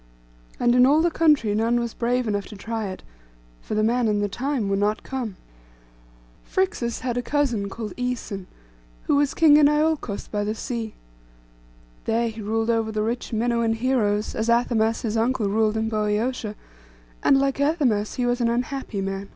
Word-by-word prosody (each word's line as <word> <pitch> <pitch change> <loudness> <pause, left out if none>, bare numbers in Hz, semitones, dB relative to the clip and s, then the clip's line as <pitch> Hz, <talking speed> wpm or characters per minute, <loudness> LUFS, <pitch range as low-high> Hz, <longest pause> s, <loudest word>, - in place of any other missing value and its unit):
And 240 0 +3
in 250 +1 +6
all 305 +4 +4
the 345 - +2
country 300 -11 +3
none 230 +3 +2
was 235 -1 -3
brave 245 0 0
enough 205 -1 -1
to 210 - -10
try 220 +1 -4
it; 185 - -7 0.6
for - - -4
the 215 - +2
man 235 +1 +2
and 210 -1 +1
the 205 - +1
time 250 +2 -2
were 195 - +1
not 205 +2 0
come. 245 -7 -4 1.1
Phrixus 370 -11 -1
had 245 0 -2
a - - +1
cousin 245 -7 0
called 210 -1 -6
Æson, 245 -6 -4 0.6
who - - +1
was 285 -1 +1
king 300 -2 +6
in 295 -1 +6
Iolcos 300 -8 0
by 205 -1 -2
the 210 +1 -2
sea. 230 -2 -4 1.1
There 230 +1 +1
he 220 0 -8
ruled 225 +2 0
over 225 -1 0
the 215 0 -1
rich 235 +3 -3
Minuan 235 0 +1
heroes, 225 -3 0
as 220 +1 -2
Athamas 230 -1 +2
his 225 -1 -1
uncle 230 -1 +1
ruled 215 +1 +1
in 220 0 0
Boeotia; 215 +1 -1 0.7
and, 275 - +5
like 275 0 0
Athamas, 275 -9 +1
he 250 - 0
was 245 0 0
an 235 - +2
unhappy 245 -3 -2
man. 195 0 -4
230 Hz, 180 wpm, -24 LUFS, 215-250 Hz, 1.1 s, in